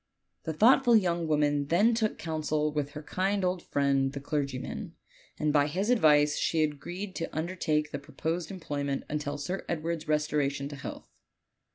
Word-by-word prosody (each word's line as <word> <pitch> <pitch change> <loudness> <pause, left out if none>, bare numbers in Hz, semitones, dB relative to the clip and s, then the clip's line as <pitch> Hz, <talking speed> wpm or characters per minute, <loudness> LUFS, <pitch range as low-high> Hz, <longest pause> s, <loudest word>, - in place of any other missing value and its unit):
The 160 - -2
thoughtful 240 - +5
young 175 -5 +2
woman 145 -2 +2
then 200 +9 +4
took 220 -2 0
counsel 155 -2 -1
with 145 -1 -2
her 150 - -7
kind 195 +4 0
old 180 -1 0
friend 140 -3 +1
the 140 - -4
clergyman, 140 -3 -3 0.4
and 150 -1 0
by 145 -1 +4
his 195 +9 0
advice 150 -9 +4
she 160 -1 +2
agreed 175 +6 -4
to 165 -2 -4
undertake 155 -3 -1
the 145 - -3
proposed 160 +4 -3
employment 145 -7 -3
until 150 -1 -2
Sir 180 +7 -4
Edward's 165 -1 -2
restoration 150 -2 0
to 145 - -7
health. 140 - -7
155 Hz, 160 wpm, -29 LUFS, 145-175 Hz, 0.4 s, thoughtful